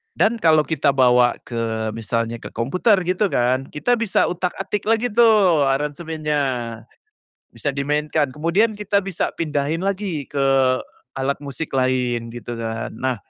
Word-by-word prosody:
dan 225 +1 +2
kalau 155 -4 +4
kita 150 -3 0
bawa 125 -2 +4
ke 110 -2 -3
misalnya 115 +1 -3
ke - - -8
komputer 180 - +2
gitu 185 +4 +1
kan, 130 -3 0
kita 240 +11 0
bisa 230 -5 +2
utak-atik 190 +3 -3
lagi 225 +2 +1
tuh 205 -10 +4
aransemennya, 150 +2 -1 1.1
bisa 145 - -3
dimainkan, 150 +1 0
kemudian 170 - +1
kita 205 -1 +1
bisa 195 -3 -3
pindahin 150 0 -1
lagi 190 -6 -2
ke 140 -1 -1 0.7
alat 135 +2 -1
musik 145 +2 -6
lain 125 -3 0
gitu 120 +1 -7
kan 115 0 -4
nah, 130 +2 -2
150 Hz, 135 wpm, -21 LUFS, 130-185 Hz, 1.1 s, kalau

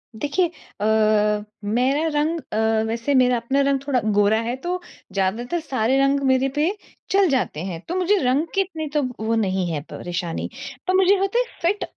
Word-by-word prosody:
देखिए 295 +8 +1 0.3
अ, - - +1 0.8
मेरा 255 +9 +1
रंग 320 +3 0
अ, - - 0 0.3
वैसे 230 +5 -1
मेरा 250 -1 +4
अपना 265 +4 0
रंग 275 -1 +2
थोड़ा 265 -3 +2 0.2
गोरा 205 +2 +4
है, 235 +2 -2
तो 355 +7 -3 0.3
ज़्यादातर 225 - -1
सारे 265 -4 0
रंग 275 +1 +3
मेरे 260 +1 +3
पे 300 +3 +2 0.4
चल 390 -3 +4
जाते 255 - 0
हैं, 175 -4 -5
तो 350 - -3
मुझे 370 +3 +2
रंग 265 +6 +2
की 390 - +4
इतनी 325 -5 -4
तो 295 - +2 0.2
वो 230 - +1
नहीं 190 -4 0
है 150 -3 -2
परेशानी। 175 -1 -4 0.4
पर 370 - +2
मुझे 385 +1 +5
होता 390 +5 +1
है - - +2 0.2
फिट 380 +5 +1
270 Hz, 180 wpm, -22 LUFS, 225-335 Hz, 0.8 s, मुझे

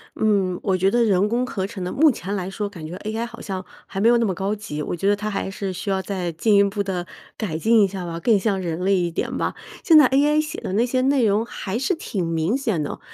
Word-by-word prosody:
嗯， 195 -4 +1
我 190 -3 +1
觉 190 +2 +3
得 240 +3 +3
人 200 -2 +3
工 245 +3 0
合 195 -8 -3
成 200 -4 -7
的， 180 - -3
目 305 +1 +5
前 200 -2 -4
来 185 -1 -3
说 205 +1 -3
感 170 -6 -9
觉 170 +3 -6
AI 220 +3 -3
好 235 0 -10
像 190 -2 -4 0.2
还 195 - -6
没 230 - +5
有 240 - +5
那 235 - +2
么 190 - 0
高 195 +4 -2
级。 150 -8 -6
我 160 - -3
觉 195 +4 -2
得 205 - +4
它 210 +1 -4
还 195 -1 -3
是 195 0 -4
需 190 +3 -5
要 190 -1 +1
再 185 -3 -3
进 205 +6 +2
一 200 - +6
步 200 +1 -1
地 180 -2 -3 0.3
改 175 -8 -3
进 225 +5 +4
一 - - +4
下 190 -2 -6
吧， 170 0 -5
更 215 +3 +3
像 195 -1 0
人 170 -2 -3
类 195 +1 +3
一 175 -2 0
点 - - -3
吧。 - - -1 0.3
现 320 -2 +7
在 290 -4 +8
AI 295 +3 +3
写 310 +2 -6
的 185 - -4
那 230 +4 +3
些 255 +1 0
内 265 -2 +3
容 210 +2 +2
还 205 -2 -4
是 275 +8 0
挺 195 - -3
明 165 +8 0
显 220 - -1
的， 145 - -4
200 Hz, 305 characters per minute, -22 LUFS, 185-230 Hz, 0.3 s, 在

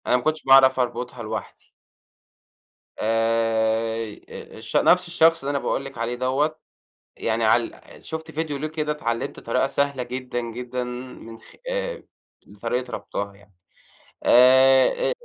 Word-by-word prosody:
أنا 125 - +4
ما 125 - -5
كنتش 155 0 -1
باعرف 135 -1 +6
أربطها 125 0 -3
لوحدي. 110 - -7 1.3
آآ، 115 0 +1 0.3
آآ، - - -10
الش 110 0 -9
نفس 180 0 +4
الشخص 165 -2 +3
اللي 140 - -2
أنا 140 - 0
باقول 135 - -1
لِك 135 - -9
عليه 115 +1 -2
دوَّة 135 +5 0 0.6
يعني 115 0 -1
عال 115 +1 +1 0.2
شُفت 160 0 -6
فيديو 155 -1 -3
ليه 150 +3 -3
كده 155 -1 -2
اتعلِّمت 115 -6 -3
طريقة 125 +3 0
سهلة 140 -1 -1
جدًا، 125 0 -4
جدًا 125 +2 -5
من 125 -2 -9
خ - - -17 0.2
آآ، - - -3 0.6
طريقة 125 +2 -2
ربطها 100 0 -5
يعني، 100 0 -22 0.7
آآ، 130 - +5
125 Hz, 140 wpm, -23 LUFS, 115-140 Hz, 1.3 s, باعرف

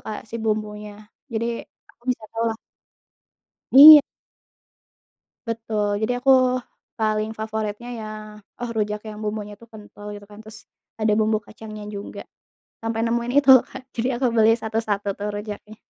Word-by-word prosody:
Kak 215 0 -6
si 225 +1 -7
bumbunya. 210 -1 -4 0.3
Jadi 230 +1 -2 0.3
aku - - -35
bisa 240 -3 -1
tau 230 0 -2
lah. - - -9 1.2
Iya. 295 +2 +12 1.5
Betul, 215 -3 -2
jadi 245 +3 -2
aku 270 - +1 0.7
paling 215 0 0
favoritnya 220 +1 -5
ya, 220 - -7 0.6
oh 240 - -3
rujak 210 0 -1
yang 210 - -9
bumbunya 210 -1 -5
itu 230 - -16
kental 205 -1 -13
gitu 205 0 -11
kan, 205 - -14
terus 220 0 -14 0.3
ada 215 -1 +2
bumbu 215 0 +2
kacangnya 215 0 -11
juga. 205 -1 -8 0.6
Sampai 225 0 -2
nemuin 235 +1 -1
itu 280 -1 0
loh 255 - +6
Kak, 260 - -9
jadi 240 +2 -1
aku 260 - +1
beli 220 -1 +5
satu-satu 220 -2 -2
tuh 205 +1 -5
rujaknya. 210 +1 -8
220 Hz, 145 wpm, -22 LUFS, 210-230 Hz, 1.5 s, Iya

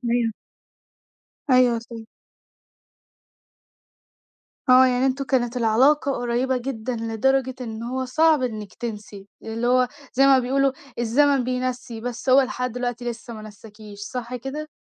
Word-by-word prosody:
أيوة. 235 -1 +1 1.2
أيوة 250 -2 +5
صح. 230 +1 -10 2.7
آه، 255 +1 +7
يعني 255 +1 +2
أنتم 270 +1 -1
كانت 250 -2 0
العلاقة 265 +5 +3
قريّبة 245 +1 -1
جدًا، 250 -1 -4
لدرجة 255 +4 0
إن 225 -2 -6
هو 260 +2 -3
صعب 310 +2 +3
إنِك 215 -5 -4
تنسي، 210 -4 -7 0.2
اللي 225 +2 -3
هو 250 0 +3 0.2
زي 270 +2 +4
ما 270 -1 +6
بيقولوا 270 +2 +1 0.3
الزمن 265 +3 +3
بينسّي 250 -2 -3
بس 240 +1 -6
هو 260 +1 +7
لحد 250 -2 -2
دلوقتي 245 0 -4
لسه 235 0 -9
ما 215 - -9
نساكيش، 210 0 -12
صح 245 +4 -5
كده؟ 290 +5 -6
245 Hz, 130 wpm, -23 LUFS, 230-260 Hz, 2.7 s, آه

